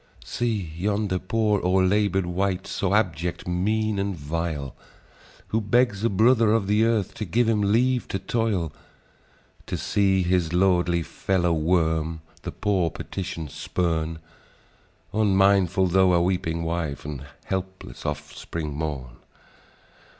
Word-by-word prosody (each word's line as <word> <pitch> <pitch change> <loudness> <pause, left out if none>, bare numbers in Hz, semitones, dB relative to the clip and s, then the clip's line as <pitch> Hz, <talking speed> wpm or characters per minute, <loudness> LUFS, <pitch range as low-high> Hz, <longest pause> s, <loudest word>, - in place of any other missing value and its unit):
"See 110 -9 -2
yonder 100 +1 0
poor, 105 +1 +1
o'erlabour'd 95 +1 +2
wight, 95 +2 -1
So 100 -1 -2
abject, 90 -4 -1
mean, 105 +4 0
and 100 -1 -1
vile, 75 -2 -4 0.7
Who 110 - +1
begs 115 -1 +2
a 115 - +3
brother 110 +2 +4
of 115 -3 +2
the 105 +3 +3
earth 115 -4 0
To - - -5
give 110 +5 +1
him 110 -2 +2
leave 120 +5 +2
to - - -2
toil; 95 -6 -1 0.9
And - - -3
see 95 -2 +2
his 85 -2 +1
lordly 90 -2 +2
fellow 90 0 0
worm 80 -1 +1 0.2
The - - -5
poor 95 -5 0
petition 85 -2 -5
spurn, 80 +1 -2 1.0
Unmindful, 95 -2 +3
tho' 95 0 +4
a 85 - +4
weeping 85 -2 -1
wife 80 -4 -3
And 75 -3 -5 0.2
helpless 95 -8 -5
offspring 75 +1 -5
mourn. 70 -5 -5
95 Hz, 125 wpm, -25 LUFS, 85-105 Hz, 1.0 s, brother